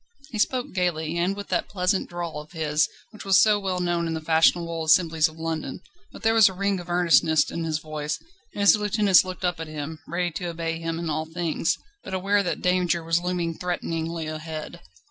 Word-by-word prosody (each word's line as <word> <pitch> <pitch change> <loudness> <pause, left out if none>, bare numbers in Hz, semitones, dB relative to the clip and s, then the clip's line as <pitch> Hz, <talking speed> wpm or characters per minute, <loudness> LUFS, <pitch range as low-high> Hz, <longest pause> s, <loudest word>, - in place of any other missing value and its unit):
He 220 - -4
spoke 255 +5 0
gaily, 170 -3 -1
and 185 +3 +1
with 205 0 -8
that - - -1
pleasant 185 0 0
drawl 170 -4 -5
of 155 +3 -16
his 155 -2 +1 0.2
which 215 - -10
was 195 -1 +5
so 210 -1 +5
well 190 -2 -2
known 175 -1 0
in 165 - -2
the - - -2
fashionable 165 +1 +2
assemblies 160 0 +4
of 155 0 -13
London; 160 -4 -4 0.3
but - - -12
there 225 0 +4
was 220 -3 +7
a - - -7
ring 200 0 0
of 175 0 -10
earnestness 165 -3 +3
in 165 - -3
his 155 -1 0
voice, 155 -1 -4 0.3
and 205 - -5
his 200 +2 +7
lieutenants 210 -2 +4
looked 185 0 -5
up 175 -2 -1
at 160 - -5
him, 155 +1 -6
ready 175 +1 -1
to 180 - -5
obey 165 -1 -3
him 165 0 -3
in 170 0 -4
all 155 0 -1
things, 165 -1 -1 0.3
but 190 - -5
aware 200 +2 +2
that 180 - -3
danger 180 -2 +1
was 165 +1 +1
looming 175 -2 -1
threateningly 165 -1 -3
ahead. 155 +2 -6
170 Hz, 210 wpm, -25 LUFS, 160-185 Hz, 0.3 s, was